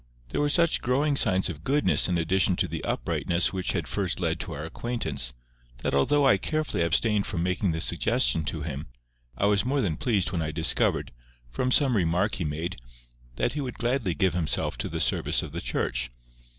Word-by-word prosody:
There - - -1
were 145 - +2
such 170 +2 +2
growing 140 +4 +1
signs 95 -7 +3
of 80 -4 -6
goodness 140 -5 +2
in 90 - +1
addition 90 +3 +2
to 90 - 0
the 80 -1 -5
uprightness 85 +2 0
which 95 -1 -1
had - - -2
first 95 -3 -1
led 85 -2 -1
to 85 - -5
our 75 +2 -5
acquaintance, 80 - -3 0.5
that - - -1
although 140 - +3
I 115 -7 +5
carefully 155 - -2
abstained 100 +5 +2
from 85 -4 -2
making 90 +1 0
the 80 0 -3
suggestion 95 -1 +2
to 75 0 -3
him, 75 -1 -5 0.5
I - - +1
was 100 -1 +3
more 135 +4 0
than 85 -11 0
pleased 105 -7 0
when 85 -4 -1
I 80 - -2
discovered, 80 +1 +1 0.4
from 125 - -1
some 135 -2 +4
remark 90 +2 +1
he 90 - -2
made, 80 +4 -3 0.6
that - - 0
he 150 - -3
would 125 -3 -5
gladly 120 -7 0
give 95 -3 +1
himself 80 -3 -1
to - - -2
the - - -4
service - - +2
of - - -7
the - - -5
Church. - - -1
95 Hz, 200 wpm, -26 LUFS, 80-125 Hz, 0.6 s, I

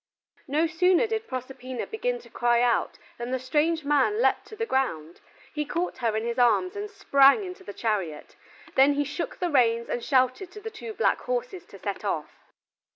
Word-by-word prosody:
No 300 +4 +2
sooner 360 +6 +3
did 445 0 -3
Proserpina 255 -1 -5
begin - - -2
to - - -16
cry 240 0 +2
out 240 -1 +1 0.2
than 240 +1 -4
the 260 - 0
strange 300 +5 0
man 295 +9 +2
leaped - - +2
to 435 - -10
the 455 - -2
ground; 170 - -2 0.3
he 300 - -1
caught 340 0 -3
her 225 -3 0
in 220 - -2
his 235 +1 -2
arms 245 - +3
and 410 +1 -4
sprang 280 -3 +4
into 365 -1 -8
the - - -7
chariot, 195 -9 -3 0.4
then 275 +2 +5
he 290 +1 +1
shook 300 +5 -5
the 355 -2 -1
reins 235 -4 +3
and 240 - -2
shouted 260 +6 +1
to 425 - -8
the 445 +2 -7
two 435 0 -8
black 460 - +2
horses - - -4
to - - -13
set - - -5
off. - - -2
285 Hz, 195 wpm, -26 LUFS, 245-380 Hz, 0.4 s, then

